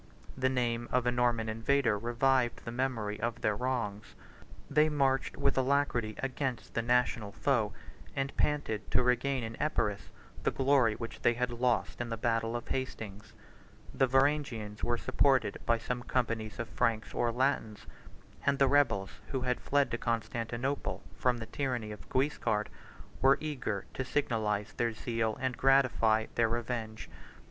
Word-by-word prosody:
70 130 - -12
The 130 - +4
name 120 -2 -1
of 125 -1 +2
a 120 - +3
Norman 120 -2 +1
invader 115 +2 +2
revived 120 +3 +1
the 115 - -4
memory 115 -5 -2
of 115 0 -2
their 105 - +1
wrongs: 105 -4 -3 0.5
they 150 +2 +4
marched 135 -3 +1
with 140 - +2
alacrity 130 -5 +1
against 135 -2 -3
the 115 - +1
national 120 -3 +1
foe, 115 -1 +1 0.4
and 135 0 -2
panted 145 -8 -1
to - - +3
regain 125 +1 +1
in 115 0 -5
Epirus 105 -9 0 0.3
the - - +2
glory 135 -5 +3
which 115 +1 -7
they 120 - +3
had 125 0 -1
lost 120 0 0
in 120 - -3
the 115 - -3
battle 115 0 0
of 120 - -4
Hastings. 110 -6 -5 0.6
The 135 - +3
Varangians 135 -6 +1
were 120 0 +1
supported 130 -5 +2
by 115 - +4
some 120 +2 -3
companies 115 -3 -2
of 115 - -3
Franks 110 -2 0
or 120 -1 +1
Latins; 115 -4 0 0.6
and 140 0 +2
the 135 - +4
rebels, 120 -9 +2
who 130 - -2
had 125 -1 -1
fled 145 0 +2
to 115 - -2
Constantinople 120 +3 -2
from 125 -1 +1
the 115 - -5
tyranny 125 -4 -2
of 105 - -10
Guiscard, 130 -6 0 0.5
were 135 +2 +6
eager 130 -10 -3
to 130 - -2
signalize 110 -6 -1
their 115 -1 0
zeal 110 0 -1
and 130 -1 -1
gratify 125 -5 +4
their 115 -1 +2
revenge. 115 -2 -3
120 Hz, 155 wpm, -31 LUFS, 110-135 Hz, 0.6 s, were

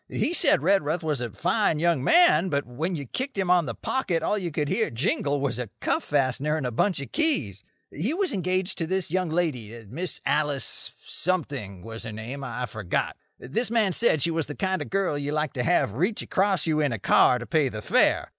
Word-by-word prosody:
He 330 - -1
said 150 - +3
Redruth 170 -3 +2
was 150 -5 -1
a 120 - -2
fine 180 - +1
young 165 -4 +1
man, 190 - +5
but 140 -2 0
when 155 +9 -3
you 145 -3 -5
kicked 260 - -4
him 190 -2 +1
on 175 -4 +4
the 115 - -4
pocket 180 -11 -1
all - - +1
you 185 -4 -2
could 150 -1 -2
hear - - 0
jingle 140 +4 0
was 135 -3 -1
a 120 -4 -4
cuff - - 0
fastener 145 +2 0
and 145 - -3
a 125 - -1
bunch 175 - +1
of 140 - -8
keys. 145 - 0 0.3
He 185 - -2
was 370 -1 0
engaged 185 -1 -1
to 165 - -1
this 185 -2 -1
young 185 -1 0
lady—Miss 130 - -3
Alice— 145 -1 0
something 140 - -3
was 115 0 -8
her 115 - -6
name; 115 +6 -6
I've 125 -3 -4
forgot. 110 -6 -2 0.2
This 215 - -2
man 220 -5 +2
said 160 - +3
she 170 - +2
was 165 -2 -1
the 145 - -6
kind 190 -1 -1
of - - -5
girl 190 -7 0
you 145 +1 -3
like 150 -2 -1
to 125 - -2
have 155 - +2
reach 185 - -1
across 195 -1 +1
you 155 -2 +1
in 145 -3 +1
a 115 - -2
car 115 +4 +4
to 125 - -7
pay 155 -3 +2
the 110 -3 -7
fare. - - +2
155 Hz, 220 wpm, -26 LUFS, 125-185 Hz, 0.3 s, man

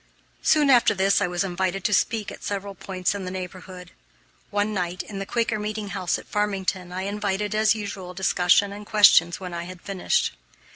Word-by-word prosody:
Soon 295 -3 +4
after 245 -4 +5
this 195 +1 +3
I 200 - +2
was 175 +1 -1
invited 190 0 -2
to 210 - +1
speak 220 +1 +1
at - - -11
several 200 0 -4
points 185 -1 -2
in 200 -1 -5
the 185 - -4
neighborhood. 185 0 -8 0.6
One 205 +1 0
night, 180 -1 -2
in 200 -2 -7
the 195 - -5
Quaker 230 -2 0
Meeting 210 0 -4
House 185 -2 -1
at - - -11
Farmington, 195 -3 -2
I 185 +1 -4
invited, 205 0 -2
as 215 +1 +3
usual, 195 -4 -6
discussion 190 +1 +3
and 205 +1 -8
questions 205 -5 +5
when 180 -2 -7
I 170 0 -4
had 180 0 -9
finished. 190 - 0
195 Hz, 190 wpm, -24 LUFS, 185-210 Hz, 0.6 s, after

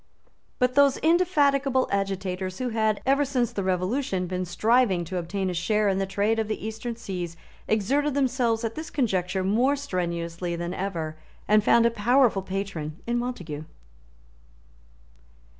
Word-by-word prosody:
But 250 0 +2
those 280 -1 +5
indefatigable 285 -6 +2
agitators 190 -1 -2
who 255 -1 -2
had, 220 -2 0
ever 275 +2 +3
since 255 -4 0
the 200 - -3
Revolution, 185 +2 0
been 185 +1 -3
striving 200 0 +2
to 185 +3 -4
obtain 190 +3 -3
a 180 - -1
share 210 +5 +1
in 195 -1 +1
the 195 - -1
trade 205 +4 +1
of 220 - -1
the 215 -1 -4
Eastern 220 +2 -4
seas 180 -7 -5 0.3
exerted 275 +7 +1
themselves 250 -4 +1
at 225 -1 -2
this 315 +4 -6
conjuncture 190 -8 0
more 240 +9 +2
strenuously 170 -8 -3
than 170 +1 -4
ever, 165 -5 -4 0.3
and 215 0 +4
found 235 +2 +5
a 235 - +4
powerful 235 -1 +3
patron 190 -5 -4
in 240 +1 0
Montague. 175 -12 -5
210 Hz, 150 wpm, -26 LUFS, 185-250 Hz, 0.3 s, those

